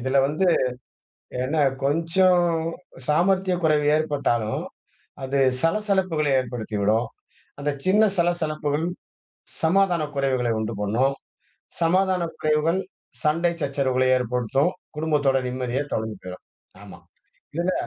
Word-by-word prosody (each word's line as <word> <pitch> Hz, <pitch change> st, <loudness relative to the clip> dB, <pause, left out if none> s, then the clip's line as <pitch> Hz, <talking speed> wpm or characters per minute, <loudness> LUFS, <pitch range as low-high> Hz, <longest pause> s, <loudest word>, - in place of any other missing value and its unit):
இதுல 130 Hz, +2 st, 0 dB
வந்து 155 Hz, +7 st, 0 dB, 1.0 s
என்ன 145 Hz, +5 st, -1 dB, 0.3 s
கொஞ்சம் 175 Hz, +4 st, +3 dB, 0.6 s
சாமர்த்திய 185 Hz, +4 st, +2 dB
குறைவு 150 Hz, -2 st, +3 dB
ஏற்பட்டாலும், 140 Hz, -8 st, -1 dB, 0.6 s
அது 135 Hz, +1 st, 0 dB, 0.2 s
சலசலப்புக்கள 185 Hz, -4 st, +1 dB
ஏற்படுத்திவிடும். 110 Hz, -2 st, -1 dB, 0.5 s
அந்த 145 Hz, +1 st, -1 dB
சின்ன 205 Hz, +3 st, +4 dB
சலசலப்புகள், 160 Hz, -3 st, 0 dB, 0.8 s
சமாதான 175 Hz, -1 st, +3 dB
குறைவுகளை 130 Hz, -3 st, +1 dB
உண்டு 110 Hz, +1 st, -3 dB
பண்ணும். 120 Hz, +7 st, +1 dB, 0.7 s
சமாதான 185 Hz, +2 st, +2 dB, 0.2 s
குறைவுகள் 155 Hz, +4 st, +1 dB, 0.4 s
சண்டை 170 Hz, +3 st, +2 dB
சச்சரவுகளை 130 Hz, -2 st, +1 dB
ஏற்படுத்தும். 125 Hz, -, 0 dB, 0.3 s
குடும்பத்தோட 150 Hz, -4 st, +2 dB
நிம்மதியே 125 Hz, +2 st, -2 dB
தொலைஞ்சு 110 Hz, -2 st, -3 dB
போயிரும். 90 Hz, 0 st, -9 dB, 0.4 s
ஆமா. -, -, -12 dB, 0.6 s
இதுல 175 Hz, +3 st, 0 dB
150 Hz, 95 wpm, -24 LUFS, 130-170 Hz, 1.0 s, சின்ன